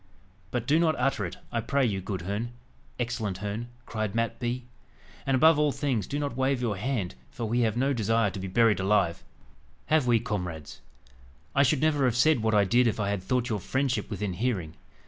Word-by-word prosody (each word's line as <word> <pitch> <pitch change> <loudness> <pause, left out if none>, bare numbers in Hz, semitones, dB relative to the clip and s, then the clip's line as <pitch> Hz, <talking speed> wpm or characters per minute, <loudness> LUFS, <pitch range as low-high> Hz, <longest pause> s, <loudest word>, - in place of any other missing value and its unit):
"But 120 0 -2
do 150 +5 +3
not 160 -2 +3
utter 125 -6 0
it, - - -9
I 115 - 0
pray 140 +3 +1
you, 100 -5 -1
good 95 -2 -4
Herne 105 +6 -3 0.5
excellent 115 -5 -2
Herne," 105 +4 -4 0.2
cried 110 -2 -3
Mat 115 0 -1
Bee. 125 +1 -2 0.6
"And, 135 - +3
above 160 +3 +6
all 150 -1 +3
things, 130 - -1
do 145 - -3
not 145 -4 -2
wave 130 0 +1
your 115 -4 -1
hand, 105 -3 -2 0.2
for 120 - -5
we 115 +3 0
have 115 -1 +1
no 135 +3 +2
desire 115 -2 +1
to 95 - -6
be 95 - -4
buried 105 +1 +3
alive, 95 -3 +1 0.6
have 155 -2 +2
we, 120 -2 +4
comrades? 90 -9 -5 0.7
I 140 - +4
should 140 0 +3
never 150 -3 +3
have 120 -2 +2
said 140 -1 +4
what 110 0 +1
I 105 - +5
did 120 +5 +3
if 110 - -1
I 100 -1 0
had 100 -2 -2
thought 125 +6 0
your 105 -2 -1
friendship 130 +6 -1
within 105 -2 -3
hearing." 95 -7 -2
115 Hz, 205 wpm, -28 LUFS, 100-130 Hz, 0.7 s, above